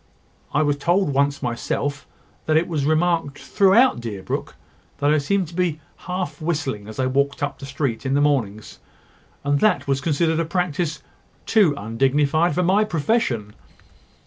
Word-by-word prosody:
I 150 - +2
was 145 -1 +1
told 175 +1 +1
once 140 +1 +1
myself, 140 +4 -3 0.4
that 155 0 +3
it 165 - +1
was 150 -5 -1
remarked 160 -2 +1
throughout 200 - +3
Deerbrook 105 -5 -5 0.4
that 145 +1 +2
I 155 - +3
seemed 190 +5 0
to - - -13
be 170 -3 -1 0.3
half 180 -5 -4
whistling 140 -10 -2
as 110 +2 -9
I 130 - +2
walked 140 +2 0
up 145 -1 -3
the 135 - -8
street 140 -4 -2
in 135 0 0
the - - +3
mornings; 115 -8 -1 0.6
and 145 0 +1
that 215 - +3
it - - -17
was 135 -1 0
considered 160 +2 +1
a 165 - 0
practice 165 -3 -2 0.4
too 195 -10 +3
undignified 140 +9 +1
for 180 - +1
my 190 +4 +3
profession." 150 - -1
145 Hz, 165 wpm, -22 LUFS, 135-170 Hz, 0.6 s, that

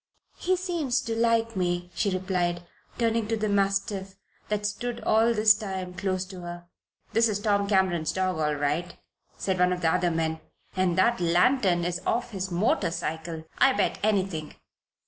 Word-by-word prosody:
"He 370 +1 +1
seems 340 -8 -1
to 225 - -3
like 230 0 +1
me," 175 -1 -1
she 200 - 0
replied, 180 -2 -1 0.3
turning 230 -2 +1
to 225 0 0
the 215 0 -1
mastiff 195 -1 0 0.3
that 210 -1 0
had - - -5
stood 235 +3 -3
all 225 +2 +3
this 215 -1 +6
time 190 -4 -5
close 185 0 -2
to 185 -1 -10
her. 175 0 -7 0.5
"That 230 +1 +4
is 205 - 0
Tom 205 -1 +1
Cameron's 190 -5 +2
dog 185 -3 -1
all 150 -1 +1
right," 145 +5 -1 0.4
said 190 -2 -1
one 180 0 +4
of 180 0 -2
the 160 -1 +2
other 175 - +2
men. 160 -1 -1 0.4
"And 185 -2 +1
that 235 +2 +3
lantern 175 +1 +3
is 175 0 -2
off 240 +1 0
his 190 -2 -3
motorcycle, 165 -4 -1 0.2
I 270 - +6
bet - - 0
anything! 195 -7 -1
190 Hz, 170 wpm, -27 LUFS, 175-220 Hz, 0.5 s, this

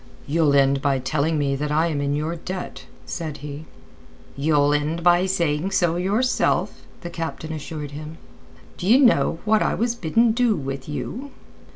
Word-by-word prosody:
"You'll 150 -1 +2
end 135 0 +3
by 140 -1 +2
telling 150 +4 0
me 140 -2 0
that 150 +2 -3
I 155 +2 +3
am 155 -4 -1
in 140 0 0
your 155 +3 -2
debt," 180 +2 -7 0.2
said 155 -4 -5
he. 150 +2 -7 0.7
"You'll 145 0 +2
end 155 +3 -1
by 175 +2 +4
saying 170 -2 0
so 170 -3 +2
yourself," 205 +8 0 0.2
the 175 - -6
captain 160 -1 -5
assured 150 -1 -6
him. 155 +2 -8 0.6
"D'ye 210 +8 +4
know 250 -10 +4
what 215 0 +3
I - - +1
was 235 +1 0
bidden 230 +3 +2
do 235 -1 +2
with 135 -2 -5
you?" 250 - -5
160 Hz, 165 wpm, -23 LUFS, 145-185 Hz, 0.7 s, by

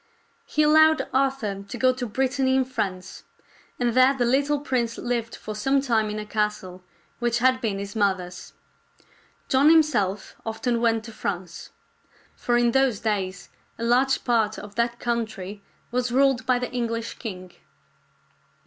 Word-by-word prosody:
He 305 - +1
allowed 315 +1 +5
Arthur 265 -7 0
to 200 +5 -8
go 255 +2 +3
to 250 -1 -4
Brittany 260 +3 0
in 265 -1 +2
France, 190 -8 -4 0.6
and 240 -1 +1
there 255 +2 +5
the 245 - +1
little 280 +4 +2
prince 245 -5 -1
lived 240 -2 -3
for 215 - -7
some 270 +6 +1
time 230 -5 +1
in 210 - -4
a 210 - -5
castle 210 -4 -3 0.4
which 240 -1 +1
had 255 +1 +2
been 210 -4 -1
his 200 +1 -6
mother's. 185 -4 -2 0.9
John 270 +3 +4
him 320 -1 +7
self 205 -9 -2
often 230 +1 -2
went 225 -1 +2
to 230 - -9
France; 185 -5 -5 0.7
for 240 0 0
in 240 0 +3
those 265 -4 +2
days 190 -4 -2 0.3
a 230 - -5
large 255 +3 +2
part 225 -3 +1
of 205 0 -9
that 235 +2 -1
country 220 -5 -3 0.3
was 250 0 -1
ruled 265 0 +2
by 255 -1 +3
the 250 0 -4
English 230 -2 -3
king. 185 -5 -7
235 Hz, 155 wpm, -24 LUFS, 210-260 Hz, 0.9 s, him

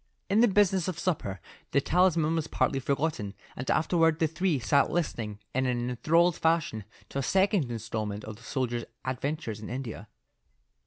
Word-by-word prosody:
In 205 - +4
the 240 - +7
business 190 -3 +3
of 185 - -3
supper 100 - -2 0.3
the 140 - +5
talisman 170 0 +3
was 160 -1 -1
partly 135 - +1
forgotten, 135 -7 -1 0.2
and 125 - -5
afterward 165 -1 +3
the 165 - +2
three 165 +1 0
sat 140 +3 +3
listening 115 -11 -2 0.2
in 130 0 +1
an 120 0 -1
enthralled 165 +7 +3
fashion 160 -10 +1 0.2
to 140 - -3
a - - +1
second 190 - +2
instalment 110 -2 -4
of 110 - -7
the - - -18
soldier's 120 -1 -2 0.2
adventures 130 -3 -3
in 105 - -8
India. 120 -4 -5
140 Hz, 165 wpm, -29 LUFS, 120-165 Hz, 0.3 s, the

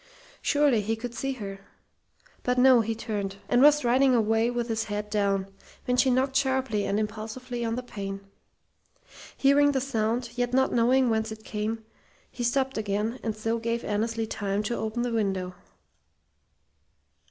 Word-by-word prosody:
Surely 285 -6 +3
he 220 +2 -1
could 235 +1 -6
see 270 +2 -2
her! 200 -5 -7 0.8
But 250 0 0
no, 250 -1 +6
he 225 +1 -2
turned, 205 -3 -4
and 245 - +3
was 295 +1 +8
striding 255 0 +3
away 225 0 +2
with 240 -1 -2
his 225 -1 -1
head 210 0 -4
down, 195 -2 0 0.3
when 250 - +1
she 250 +1 +4
knocked 260 +1 +1
sharply 265 -6 +1
and 200 - 0
impulsively 220 +3 -4
on 225 0 -1
the 250 - -4
pane. 195 -4 -6 1.2
Hearing 285 +1 +4
the 265 - +1
sound, 235 -2 -1
yet 245 0 -1
not 265 0 +2
knowing 245 +1 +3
whence 220 0 0
it 220 0 -9
came, 220 +1 -4 0.5
he 245 - -5
stopped 265 0 0
again, 215 +3 -2
and 220 -2 -3
so 225 +2 -1
gave 230 +1 -2
Annesley 225 +2 -1
time 205 -1 -2
to 235 +3 -2
open 220 +2 -2
the 245 -1 -2
window. 190 -4 -1
230 Hz, 165 wpm, -27 LUFS, 215-250 Hz, 1.2 s, was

